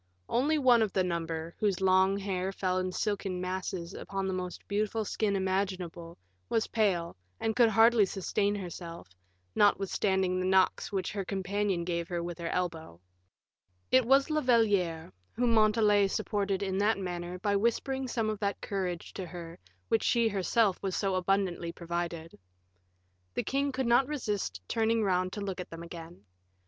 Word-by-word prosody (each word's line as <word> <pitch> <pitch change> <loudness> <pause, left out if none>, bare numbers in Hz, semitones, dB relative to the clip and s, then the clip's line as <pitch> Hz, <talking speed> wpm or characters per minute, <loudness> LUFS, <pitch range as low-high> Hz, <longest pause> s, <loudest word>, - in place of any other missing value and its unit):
One 260 - +1
only - - +4 0.3
of 210 - -2
the 190 - +2
number, 165 -1 -3
whose 200 -4 +1
long 190 +1 +4
hair 190 -1 -2
fell 185 -1 -1
in 185 0 -2
silken 195 -2 -2
masses 180 -1 -4
upon 195 0 -4
the 190 - -1
most 180 -1 -5
beautiful 215 +2 -1
skin 205 0 0
imaginable, 185 -3 -2 0.3
was 225 - +1
pale, 185 -7 0 0.2
and 220 -1 -1
could 240 -2 +5
hardly 225 -1 +5
sustain 200 +2 -1
herself, 170 - -7 0.4
notwithstanding 190 -2 +2
the 185 - 0
knocks 190 +2 +2
which 195 -2 -2
her 200 -2 -3
companion 195 -1 -1
gave 170 -1 -2
her 175 -1 -3
with 175 0 -6
her 170 - -3
elbow. 165 - -3 0.9
It 260 0 +6
was 275 +5 +4
La 305 0 +2
Valliere 200 - +2 0.2
whom 240 -1 +1
Montalais 215 -2 +4
supported 200 -1 -1
in 190 0 -1
that 210 +1 +3
manner 180 -1 -4
by 200 +2 0
whispering 260 +5 0
some 230 -3 -1
of 215 -1 -2
that 200 -1 -1
courage 185 -4 -4
to 185 -2 -5
her 170 -1 -9 0.3
with - - -42
which 225 - +2
she 235 -2 +3
herself 200 0 +1
was 190 -2 -2
so 195 -2 0
abundantly 185 -2 0
provided. 170 -1 -5 1.0
The - - 0
king 280 +1 0
could 260 0 -2
not 240 +3 +4
resist 210 - -3
turning 225 0 +1
round 185 -2 +1
to 205 - -4
look 195 -2 -4
at - - -9
them 165 0 -8
again. 170 - -10
195 Hz, 165 wpm, -30 LUFS, 180-215 Hz, 1.0 s, It